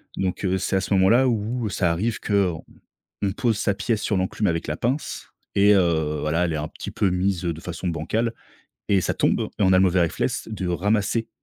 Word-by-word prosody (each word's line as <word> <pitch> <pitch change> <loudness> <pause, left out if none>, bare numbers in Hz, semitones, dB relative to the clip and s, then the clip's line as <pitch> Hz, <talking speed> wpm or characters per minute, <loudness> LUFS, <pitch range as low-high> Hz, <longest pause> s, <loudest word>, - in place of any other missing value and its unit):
Donc, 95 +1 -2
heu, 95 0 +1
c'est - - -1
à 95 - +2
ce 100 - -2
moment-là 110 +8 +5
où, 115 +1 -1
heu, - - -1
ça 90 -3 +1
arrive 105 +7 -1
qu'on 95 -5 0 0.6
on 100 -1 +1
pose 115 -2 0
sa 100 - +1
pièce 110 +1 -1
sur 105 - 0
l'enclume 95 +3 -1
avec 85 -3 -1
la 75 0 -2
pince 130 +6 -3 0.2
et 100 +1 +5
heu, 80 -5 +1
voilà, 75 +3 +1
elle 85 - -1
est 80 - -1
un 75 +1 -3
petit - - -8
peu 100 - +1
mise, 90 0 0
heu, 85 - +1
de 80 - -10
façon 90 +2 -5
bancale 110 +9 -1 0.5
et 100 -2 +4
ça - - -1
tombe - - +1 0.2
et - - +1
on 95 - +4
a 95 - +6
le - - +5
mauvais 95 -1 +3
réflexe 85 +5 -1
de 100 -4 -4
ramasser, 105 +5 0
95 Hz, 230 wpm, -23 LUFS, 85-105 Hz, 0.6 s, a